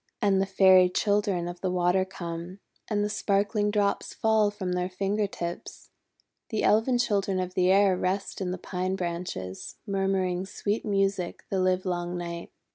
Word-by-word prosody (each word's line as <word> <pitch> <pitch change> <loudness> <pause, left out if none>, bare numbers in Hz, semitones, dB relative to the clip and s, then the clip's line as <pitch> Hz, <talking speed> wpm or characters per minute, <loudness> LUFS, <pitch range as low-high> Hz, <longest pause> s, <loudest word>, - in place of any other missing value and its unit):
And 195 -2 +3
the 195 - 0
Fairy 190 -1 +6
Children 200 -3 +1
of 175 0 -7
the 185 - 0
Water 180 +1 +2
come, 175 -1 -6 0.3
and 205 -2 +1
the - - +1
sparkling 205 0 +1
drops 205 -1 0
fall 220 -1 +3
from 195 -3 -4
their 180 0 -1
finger 200 +3 -1
tips. 175 -3 -7 0.6
The 220 - -1
Elfin 225 +4 +3
Children 200 -5 +1
of 185 0 -3
the 185 0 +2
Air 195 -1 +5
rest 190 +2 -2
in 185 - -1
the 185 - -3
pine 185 +1 -3
branches, 170 - -5
murmuring 190 -2 0
sweet 205 +2 -2
music 195 -4 -1
the 195 - +1
livelong 180 -1 0
night. 170 -1 -5
190 Hz, 160 wpm, -27 LUFS, 180-205 Hz, 0.6 s, Fairy